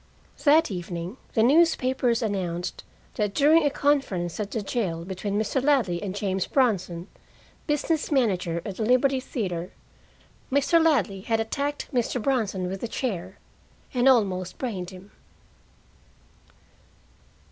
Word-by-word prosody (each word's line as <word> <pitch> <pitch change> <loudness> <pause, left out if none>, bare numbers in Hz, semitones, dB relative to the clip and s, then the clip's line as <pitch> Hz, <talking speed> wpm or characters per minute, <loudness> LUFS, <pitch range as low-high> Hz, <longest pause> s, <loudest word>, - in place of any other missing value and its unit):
That 310 -1 +5
evening 175 +3 -5 0.2
the 220 - +4
newspapers 260 -4 +3
announced 180 -4 -3 0.3
that 210 -2 -1
during 305 +3 +5
a 290 - +3
conference 270 - 0
at 205 -1 -2
the 220 -1 -3
jail 185 -7 -2
between 195 +2 -3
Mr. 250 +4 -1
Ladley 255 -12 +2
and 195 -2 -4
James 190 -2 -1
Bronson, 185 -9 0 0.6
business 300 +1 0
manager 185 - +1
at 200 -3 -5
the 225 - -1
Liberty 255 +3 +3
Theater, 185 - -4 0.8
Mr. 285 +5 +3
Ladley 215 - +2
had 225 +3 0
attacked 280 +6 -2
Mr. 245 0 0
Bronson 215 -7 0
with 190 +1 -4
a 235 - -2
chair, 190 -7 -4 0.6
and 250 +1 +4
almost 185 -7 +1
brained 195 -9 -4
him. 190 +2 -13
220 Hz, 125 wpm, -26 LUFS, 185-265 Hz, 0.8 s, That